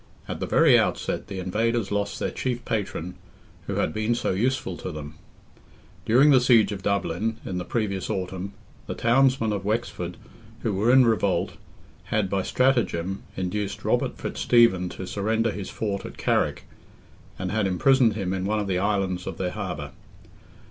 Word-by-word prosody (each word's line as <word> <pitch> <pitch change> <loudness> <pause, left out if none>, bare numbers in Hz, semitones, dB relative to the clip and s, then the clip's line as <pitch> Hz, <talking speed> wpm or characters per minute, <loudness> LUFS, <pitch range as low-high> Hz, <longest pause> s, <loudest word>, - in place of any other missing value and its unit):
At - - -5
the - - -3
very - - +6
outset, - - -1
the 100 - -6
invaders 105 +3 0
lost 100 0 -1
their - - -2
chief 120 -2 -3
patron, 95 -5 -3 0.5
who - - -2
had - - 0
been 110 +2 0
so - - -1
useful 120 0 0
to 95 - -5
them. 75 -1 -7 0.9
During 130 +7 +6
the 130 -2 +6
siege 115 -5 +5
of 100 -2 -5
Dublin, 100 +2 -1
in 90 -1 -3
the 90 - -5
previous 100 -5 -2
autumn, 95 +1 -3 0.3
the - - -4
townsmen 120 -2 +3
of 100 -2 -3
Wexford, 105 -5 -2 0.4
who 110 - -1
were 105 +5 +2
in 130 0 +7
revolt, 110 -4 +1 0.5
had, 105 -3 0
by 100 -1 +1
stratagem, 100 -7 +1 0.2
induced 100 +2 -3
Robert - - +1
Fitzstephen 105 -7 +3
to 95 - -7
surrender 110 +4 0
his 100 -2 -6
fort 100 -3 -3
at - - -9
Carrick, - - 0 0.7
and 90 -1 -3
had 110 -2 +1
imprisoned 115 +5 +3
him 95 -3 -2
in 95 -1 -2
one 105 +2 0
of 105 - -1
the 95 -2 0
islands 95 -2 -1
of - - -5
their 90 -1 -2
harbour. 90 -9 -5
100 Hz, 170 wpm, -25 LUFS, 95-115 Hz, 0.9 s, in